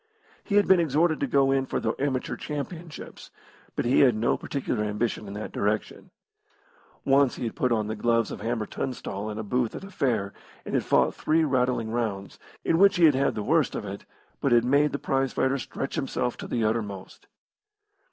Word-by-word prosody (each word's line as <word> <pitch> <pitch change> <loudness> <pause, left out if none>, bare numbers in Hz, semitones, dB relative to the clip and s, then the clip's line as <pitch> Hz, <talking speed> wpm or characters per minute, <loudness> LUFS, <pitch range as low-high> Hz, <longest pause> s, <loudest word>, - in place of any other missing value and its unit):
He 200 - -2
had 205 0 +4
been 190 -2 +6
exhorted 160 +1 +2
to 140 - 0
go 135 +1 +3
in 135 -1 +1
for - - -1
the 110 - -1
Amateur 130 -2 -1
Championships, 160 +2 -7 0.5
but - - -1
he 125 +3 +3
had 125 -5 +5
no 110 +2 +1
particular 135 -6 -3
ambition 105 0 -2
in 100 - -7
that 105 - -5
direction. 105 +1 -2 1.0
Once 135 -1 +4
he - - -6
had 115 - -3
put 125 - 0
on 110 -2 +1
the 110 +1 -3
gloves 115 0 +1
with - - -7
Hammer 115 -1 -1
Tunstall 105 -4 -4
in 105 - -5
a 110 - -3
booth 120 +2 -1
at - - -7
a 195 - -10
fair 115 - -1 0.3
and - - -6
had - - +2
fought - - +3
three 160 +1 +1
rattling 125 -5 0
rounds, 105 -5 -3 0.3
in 165 - +2
which 200 +1 +6
he 175 - +5
had 140 -3 +3
the 105 - -3
worst 155 +3 +2
of - - -4
it, 100 0 -7 0.3
but 140 - 0
had 120 0 +5
made 140 +3 +3
the - - -2
prize 135 -1 -1
fighter 135 +1 +1
stretch 135 - -5
himself 125 -2 -2
to - - -7
the 115 - -1
uttermost. 105 -4 -3
125 Hz, 200 wpm, -26 LUFS, 110-140 Hz, 1.0 s, been